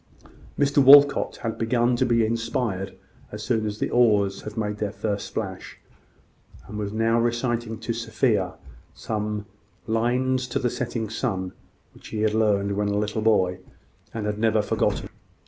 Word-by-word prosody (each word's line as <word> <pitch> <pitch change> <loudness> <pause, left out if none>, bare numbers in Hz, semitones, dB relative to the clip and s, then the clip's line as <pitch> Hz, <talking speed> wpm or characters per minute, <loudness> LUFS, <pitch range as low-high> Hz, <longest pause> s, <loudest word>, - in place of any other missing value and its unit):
Mr 145 0 +2
Walcot 145 +1 +7
had 115 -1 -3
begun 120 +2 +2
to 125 +1 +1
be 115 -2 +3
inspired 115 -4 -2 0.3
as 105 0 -7
soon 110 -2 0
as 105 0 -4
the - - -2
oars 105 -5 +3
had 105 +1 -8
made 105 -1 -2
their 105 -2 -2
first 105 -2 -3
splash, 95 -4 -6 0.9
and 105 - -8
was 100 -1 -3
now 115 +2 +2
reciting 120 -1 -1
to 115 - -3
Sophia 115 -5 0 0.4
some 105 -1 -3 0.4
"Lines 125 +3 0
to 120 - -2
the 125 - 0
Setting 120 -2 -3
Sun," 100 -5 -3 0.4
which - - -14
he 110 - -4
had 110 -1 +2
learned 105 -2 +2
when 105 0 0
a 100 0 0
little 105 +1 -1
boy, 95 -5 +2 0.5
and 110 -2 -4
had 105 0 -2
never 110 -1 +2
forgotten. - - -1
110 Hz, 160 wpm, -24 LUFS, 105-120 Hz, 0.9 s, Walcot